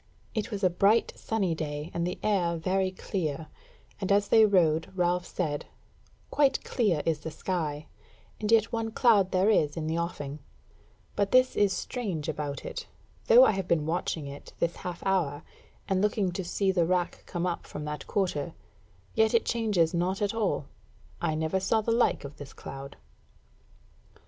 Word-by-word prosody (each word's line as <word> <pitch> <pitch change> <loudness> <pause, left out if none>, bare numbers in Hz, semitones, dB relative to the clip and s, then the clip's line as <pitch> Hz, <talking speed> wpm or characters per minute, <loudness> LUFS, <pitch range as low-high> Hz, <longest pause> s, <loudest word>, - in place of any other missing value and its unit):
It 220 +1 -2
was 205 -3 -5
a 185 - +5
bright 200 +6 +3
sunny 200 -6 -1
day 150 -1 -4
and 170 0 -1
the 180 - -3
air 180 -5 +1
very 185 +3 +1
clear, 160 -5 -3 0.5
and 195 -1 -2
as 200 0 +3
they 220 -1 +7
rode 165 -5 +2
Ralph 180 0 +1
said: 150 -5 -3 0.6
"Quite 280 -2 +3
clear 200 - +1
is 160 -2 +1
the 160 - -6
sky, 155 -3 -3 0.5
and 215 0 -1
yet 225 -1 +4
one 225 -1 -1
cloud 220 -4 +4
there 190 +3 +3
is 150 -7 +2
in 160 - -2
the 160 +2 -1
offing; 150 -4 -4 0.8
but 200 -1 +1
this 255 0 +4
is 205 -1 +3
strange 190 - -3
about 145 -3 -4
it, - - -6 0.4
though 245 +3 +9
I - - +4
have 195 -3 -3
been 155 -4 +2
watching 160 -2 -2
it 140 0 -9
this 170 0 -1
half 180 -1 -6
hour, 170 -6 0 0.4
and 190 -1 +1
looking 205 -2 +1
to 185 +2 -4
see 190 +2 0
the 175 -3 +2
rack 180 -1 0
come 175 0 -2
up 175 -2 -3
from 150 - -6
that 150 -1 -5
quarter, 170 -6 -1 0.6
yet 220 +1 +3
it 230 - +3
changes 210 -8 +1
not 180 +3 0
at 205 0 0
all. 215 -9 0 0.6
I 160 -2 0
never 160 +4 0
saw 205 +4 +2
the 230 - -1
like 230 -9 +2
of 140 +1 -9
this 145 -2 -10
cloud." 135 +1 -9
180 Hz, 175 wpm, -28 LUFS, 160-205 Hz, 0.8 s, though